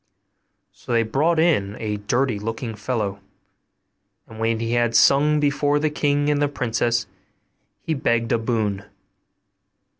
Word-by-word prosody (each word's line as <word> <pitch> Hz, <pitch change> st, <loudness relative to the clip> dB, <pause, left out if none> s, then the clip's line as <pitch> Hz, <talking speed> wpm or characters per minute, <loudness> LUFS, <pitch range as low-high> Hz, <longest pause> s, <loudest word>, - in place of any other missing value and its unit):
So 125 Hz, -, -7 dB
they 115 Hz, 0 st, +3 dB
brought 150 Hz, +9 st, +1 dB
in 135 Hz, -, +2 dB
a 105 Hz, -1 st, -3 dB
dirty 120 Hz, +2 st, -1 dB
looking 115 Hz, +2 st, -4 dB
fellow; 105 Hz, -2 st, -3 dB, 1.1 s
and 110 Hz, -, -12 dB
when 115 Hz, 0 st, 0 dB
he 115 Hz, 0 st, -2 dB
had 120 Hz, -1 st, +1 dB
sung 150 Hz, +4 st, +4 dB
before 145 Hz, 0 st, +1 dB
the 150 Hz, +1 st, 0 dB
king 145 Hz, -1 st, 0 dB
and 145 Hz, 0 st, 0 dB
the 145 Hz, -, +3 dB
princess, 120 Hz, -3 st, -1 dB, 0.8 s
he 160 Hz, -, -1 dB
begged 115 Hz, -5 st, 0 dB
a 120 Hz, -, +2 dB
boon. 110 Hz, -4 st, -2 dB
120 Hz, 140 wpm, -22 LUFS, 110-145 Hz, 1.1 s, sung